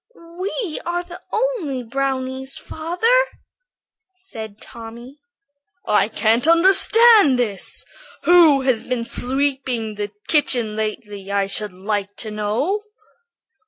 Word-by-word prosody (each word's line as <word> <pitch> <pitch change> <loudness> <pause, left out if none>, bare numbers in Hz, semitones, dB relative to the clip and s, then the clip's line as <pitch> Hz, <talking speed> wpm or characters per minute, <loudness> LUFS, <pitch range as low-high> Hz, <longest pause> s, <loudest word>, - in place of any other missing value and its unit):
"We 380 -3 -4
are 350 +1 -2
the 350 0 -11
only 425 - -2
brownies, 265 +1 -3
father," 360 +11 +1 0.9
said 220 - -9
Tommy. 235 +4 -11 0.7
"I 210 - +3
can't 225 +4 +1
understand 385 - +6
this. 215 -6 -2 0.4
Who 335 -6 +6
has 260 -4 0
been 250 -2 -2
sweeping 260 -3 -2
the 205 0 -4 0.2
kitchen 245 -8 +1
lately, 210 -2 -5
I 200 -1 +1
should 205 +1 -2
like 200 +2 -4
to 220 - -5
know?" 215 - -1
260 Hz, 105 wpm, -20 LUFS, 215-335 Hz, 0.9 s, understand